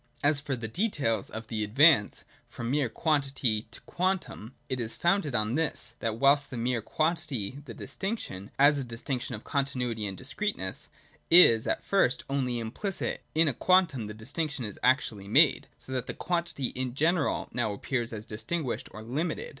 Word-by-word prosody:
As 145 0 +3
for 140 -2 -3
the 115 -2 -5
details 135 - 0
of 110 +1 -7
the 110 -1 -2
advance 120 +1 +5 0.2
from 120 +1 -4
mere 140 -3 +1
quantity 135 -5 0
to 115 - -11
quantum, 180 - -2
it 130 - -3
is 115 -1 -2
founded 175 -6 +1
on 110 +1 0
this: 145 -5 -1
that 115 -1 -2
whilst 140 +3 +3
in 120 -3 -3
mere 125 -1 0
quantity 145 - -1
the 115 - -9
distinction, 190 - -5
as 145 +1 +5
a - - -2
distinction 125 +1 -4
of 105 - -10
continuity 125 -6 -1
and 95 - -5
discreteness, 135 - -3 0.4
is 115 -10 +7
at - - -1
first 195 -10 +2
only 130 -3 0
implicit, 120 - -3
in 160 0 +4
a 145 - +2
quantum 165 - +3
the 105 - -7
distinction 140 +4 -3
is 105 - -7
actually 120 -6 +1
made, 105 - +5
so - - -12
that 130 -2 -2
quantity 170 -7 -1
in 125 -1 -4
general 160 +1 +1
novi; 110 -4 -1
appears 120 +2 -2
as 110 -1 -6
distinguished 120 +7 -3
or 110 - -8
limited. 150 +8 -3
130 Hz, 170 wpm, -29 LUFS, 115-155 Hz, 0.4 s, is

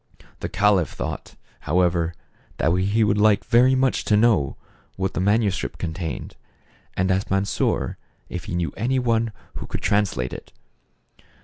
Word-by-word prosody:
The - - -4
caliph 95 -2 +3
thought, - - -6 0.3
however, 85 -1 +2 0.4
that 80 +2 +2
he 100 +4 +2
would 105 0 +2
like 105 -1 +4
very 125 +3 +5
much 130 0 +1
to 105 - +3
know 105 - +3 0.4
what 95 0 -2
the - - -2
manuscript 100 +1 +1
contained, 80 -2 -5 0.6
and 95 +1 +2
asked 95 +2 0
Mansor 95 +1 0 0.3
if 90 - -6
he 100 -4 -4
knew 85 -1 -1
any 125 +6 0
one 115 -2 +1 0.3
who - - -6
could - - -5
translate 100 -12 +1
it. - - -10
100 Hz, 145 wpm, -23 LUFS, 90-110 Hz, 0.6 s, very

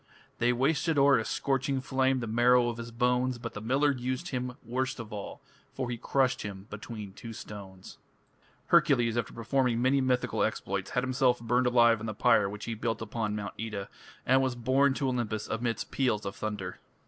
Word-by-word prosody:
They 120 +1 +3
wasted 150 +5 +1
o'er 140 -2 +6
a - - -1
scorching 135 0 0
flame 130 0 +1
The - - -2
marrow 120 +2 +4
of 115 - -5
his 115 0 -6
bones, 125 +1 +1
But 115 -1 -6
the 105 - -6
miller 135 +6 +2
used 130 +5 -3
him 125 -1 -3
worst 130 +2 -2
of 110 -2 -7
all, 100 -1 -7 0.3
For 130 -2 -3
he 120 - -3
crushed 135 +1 +1
him 100 -2 -7
between 105 -1 -7
two 115 +2 -9
stones. 95 -4 -10 0.7
Hercules, 120 -4 +4
after 120 -2 -1
performing 120 0 0
many 130 +2 +3
mythical 130 -1 0
exploits, 100 0 -1
had 125 - 0
himself 130 -1 +2
burned 120 +2 +1
alive 120 -2 +5
on 115 - -5
the 110 - -4
pyre 105 -3 +4
which 105 +1 -7
he 115 - -3
built 115 0 -2
upon 110 -1 -3
Mount 100 -2 -4
Oeta, 105 -3 -4 0.4
and 130 +1 +4
was 130 -2 0
borne 130 +3 +2
to 140 - -1
Olympus 115 -4 -2
amidst 115 0 -2
peals 120 -6 0
of 100 - -4
thunder. 105 -4 -5
120 Hz, 190 wpm, -29 LUFS, 110-130 Hz, 0.7 s, o'er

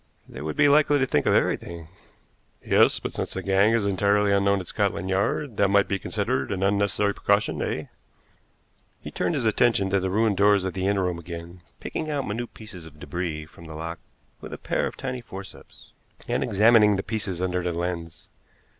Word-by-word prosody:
"They - - -9
would 75 0 -4
be 145 - +5
likely 145 0 +4
to 135 - +2
think - - 0
of - - +4
everything." 85 -2 -1 0.8
"Yes; - - +4
but - - -5
since - - -4
the 95 - -4
gang 100 +3 +3
is 115 -3 +1
entirely 100 +1 +2
unknown 100 0 +2
at 90 - -7
Scotland 95 +2 -1
Yard, 105 +6 -1
that 100 - +4
might 100 0 +3
be 100 - -1
considered 65 -3 -2
an 95 -1 -2
unnecessary 100 +1 +1
precaution, 100 +1 0
eh?" - - -2 1.2
He - - -9
turned 170 - -1
his 130 -5 -1
attention 110 -3 +2
to 100 - +3
the 95 0 -2
ruined 105 0 +1
doors 100 -1 +4
of 95 - -3
the 95 0 -2
inner 100 -1 +1
room 90 -2 -2
again, 85 +1 -9 0.2
picking 155 - -4
out 145 -3 -2
minute 115 +3 -4
pieces 95 -7 -10
of 75 - -15
débris 75 -1 -5
from 85 +1 -15
the 80 - -9
lock 85 +2 -6 0.4
with - - -9
a - - -5
pair - - -1
of - - -8
tiny 125 -1 -4
forceps, 95 -10 -12 0.4
and - - 0
examining 105 0 +5
the 95 - -2
pieces 100 -4 -3
under 90 0 -1
the 90 0 -2
lens. 85 -1 -5
100 Hz, 200 wpm, -25 LUFS, 90-105 Hz, 1.2 s, be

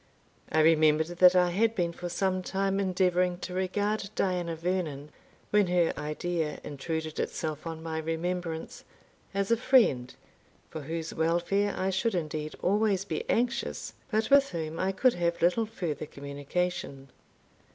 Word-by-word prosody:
I 160 - +4
remembered 155 0 +4
that 180 0 +8
I 180 -1 +4
had 225 +5 +2
been 170 -3 0
for 175 +1 -6
some 185 +1 0
time 195 +1 -1
endeavouring 180 -2 +1
to 180 - -5
regard 200 +2 -1
Diana 180 -3 0
Vernon, 160 -4 -3 0.4
when 210 -2 +4
her 175 -1 +2
idea 150 +1 -2
intruded 155 +2 -4
itself 155 0 -3
on 160 -1 -6
my 160 -1 -3
remembrance, 165 +1 -3 0.5
as 200 +2 0
a 230 - +5
friend, 215 - +3 0.6
for 160 - -5
whose 160 +2 -4
welfare 175 +5 +1
I 190 +1 0
should 195 +3 0
indeed 155 -2 -3
always 200 0 +2
be - - -4
anxious, 235 0 -1 0.2
but 220 +1 0
with 280 0 +6
whom 160 -1 -4
I 190 +1 +1
could 245 +6 +3
have 170 -1 -1
little 180 +6 +2
further 160 -9 -4
communication. 140 0 -4
175 Hz, 145 wpm, -29 LUFS, 160-195 Hz, 0.6 s, that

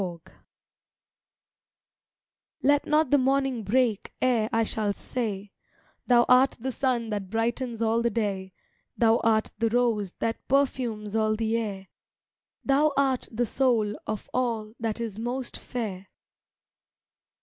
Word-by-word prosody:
TO 175 -3 -4 0.8
—— - - -50
Let 285 +1 +3
not 305 -2 +2
the 285 - +5
morning 265 -2 +1
break 230 -1 +1
ere 235 -4 +2
I 225 0 +2
shall 210 -2 -1
say 205 -4 -4 0.6
"Thou 240 -1 +5
art 255 +2 +5
the 260 +3 -3
Sun 245 -3 -1
that 200 -3 -3
brightens 230 +1 -1
all 225 +1 +2
the 235 - +2
day, 200 -4 -2 0.5
Thou 225 -1 +4
art 220 -2 +1
the 230 - +2
Rose 225 -5 +1
that 230 0 -3
perfumes 240 -6 0
all 215 -1 +2
the 225 +1 -1
air, 200 -4 -3 0.8
Thou 290 +2 +3
art 270 -2 +1
the 240 +1 0
Soul 230 -4 +1
of 215 - -4
all 230 -4 -1
that 225 -1 -2
is 220 -3 -4
most 245 +2 -3
fair." 200 -6 -5
230 Hz, 135 wpm, -27 LUFS, 215-255 Hz, 0.8 s, the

